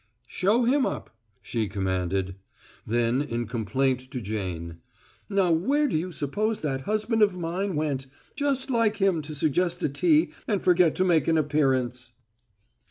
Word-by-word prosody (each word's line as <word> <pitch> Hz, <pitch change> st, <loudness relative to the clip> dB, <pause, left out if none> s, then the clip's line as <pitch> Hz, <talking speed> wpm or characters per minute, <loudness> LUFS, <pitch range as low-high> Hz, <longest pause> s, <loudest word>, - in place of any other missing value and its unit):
"Show 205 Hz, -, +1 dB
him 265 Hz, +4 st, +3 dB
up!" -, -, -4 dB, 0.3 s
she 115 Hz, -3 st, -2 dB
commanded; 95 Hz, -1 st, -2 dB, 0.5 s
then 120 Hz, +3 st, +1 dB
in 120 Hz, -5 st, -3 dB
complaint 130 Hz, +4 st, -1 dB
to 130 Hz, -2 st, -4 dB
Jane: 90 Hz, -6 st, -5 dB, 0.5 s
"Now 195 Hz, -3 st, +2 dB
where 275 Hz, -, +2 dB
do 245 Hz, -, -2 dB
you 175 Hz, +4 st, -1 dB
suppose 205 Hz, +9 st, -2 dB
that 135 Hz, -3 st, -2 dB
husband 215 Hz, +1 st, +1 dB
of 200 Hz, -3 st, +4 dB
mine 180 Hz, +2 st, -2 dB
went? 145 Hz, -3 st, -2 dB, 0.3 s
Just 275 Hz, -2 st, 0 dB
like 230 Hz, -3 st, +2 dB
him 190 Hz, -5 st, +2 dB
to 150 Hz, 0 st, -7 dB
suggest 170 Hz, +4 st, 0 dB
a -, -, +2 dB
tea 310 Hz, -, +3 dB, 0.2 s
and 205 Hz, -4 st, +1 dB
forget 180 Hz, -3 st, +3 dB
to 185 Hz, -, +2 dB
make 165 Hz, -6 st, +3 dB
an 165 Hz, -1 st, +3 dB
appearance." 130 Hz, -5 st, 0 dB
155 Hz, 155 wpm, -26 LUFS, 120-200 Hz, 0.5 s, of